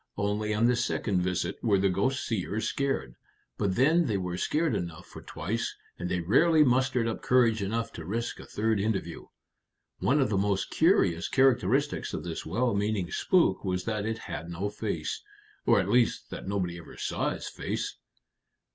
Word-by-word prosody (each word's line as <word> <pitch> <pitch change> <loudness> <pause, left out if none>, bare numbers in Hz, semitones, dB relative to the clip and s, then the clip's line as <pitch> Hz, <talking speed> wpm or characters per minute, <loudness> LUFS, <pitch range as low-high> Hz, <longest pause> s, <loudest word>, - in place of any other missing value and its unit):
Only 105 +1 -1
on 105 +2 +2
the 125 +1 +4
second 105 -5 0
visit 90 0 -1
were 105 -4 +4
the 95 +1 +3
ghost 100 +9 0
seers 110 0 -2
scared; 135 - -1 0.5
but 100 -3 +1
then 155 +6 +4
they 105 -4 0
were 90 -2 -3
scared 155 - 0
enough 85 -3 -4
for - - -11
twice, 105 +9 -3 0.2
and 90 0 -3
they 90 - 0
rarely 155 - +5
mustered 130 -2 +2
up 115 - -3
courage 115 -4 +3
enough 115 +4 -2
to 85 - -7
risk 115 +6 -3
a - - -10
third 110 0 0
interview. 105 0 -2 0.7
One 140 +3 +2
of 135 - +2
the 100 - +2
most 100 -1 0
curious 100 - +3
characteristics 135 +1 +2
of - - -5
this 85 -2 -5
well 120 +8 +1
meaning 100 -3 -1
spook 170 - +2
was 90 -2 -1
that 105 -1 -2
it 110 0 -2
had 85 -2 -5
no 95 +4 -3
face - - -3 0.5
or - - +6
at 95 - 0
least 120 +3 +2
that - - -7
nobody 90 -3 -2
ever 85 - -12
saw - - -1
its - - -5
face." - - -4
105 Hz, 180 wpm, -28 LUFS, 95-125 Hz, 0.7 s, or